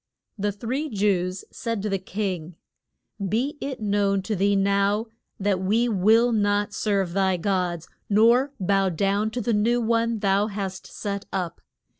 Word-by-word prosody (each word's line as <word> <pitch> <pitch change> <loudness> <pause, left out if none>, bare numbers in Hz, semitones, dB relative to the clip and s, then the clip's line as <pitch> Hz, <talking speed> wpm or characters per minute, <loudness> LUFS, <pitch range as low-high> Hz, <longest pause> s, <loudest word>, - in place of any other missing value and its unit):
The 205 -1 -1
three 250 +9 -3
Jews 190 -3 0
said 230 -4 -3
to 210 - -1
the 195 -1 0
king, 185 -4 -4 0.7
Be 245 +10 -1
it 275 -1 -4
known 200 -2 +1
to 215 +2 -2
thee 200 +2 +2
now 200 +2 +2 0.3
that 195 -2 0
we 220 +6 +2
will 225 +3 +4
not 205 -1 +1
serve 195 -5 0
thy 190 -1 +2
gods, 180 -2 -1 0.2
nor 235 +6 +4
bow 195 0 +2
down 200 +5 0
to 245 +3 -3
the 235 +1 0
new 230 +4 +2
one 230 0 +1
thou 200 0 +2
hast 195 -3 -5
set 200 -1 -5
up. 175 -3 -3
205 Hz, 155 wpm, -25 LUFS, 195-225 Hz, 0.7 s, will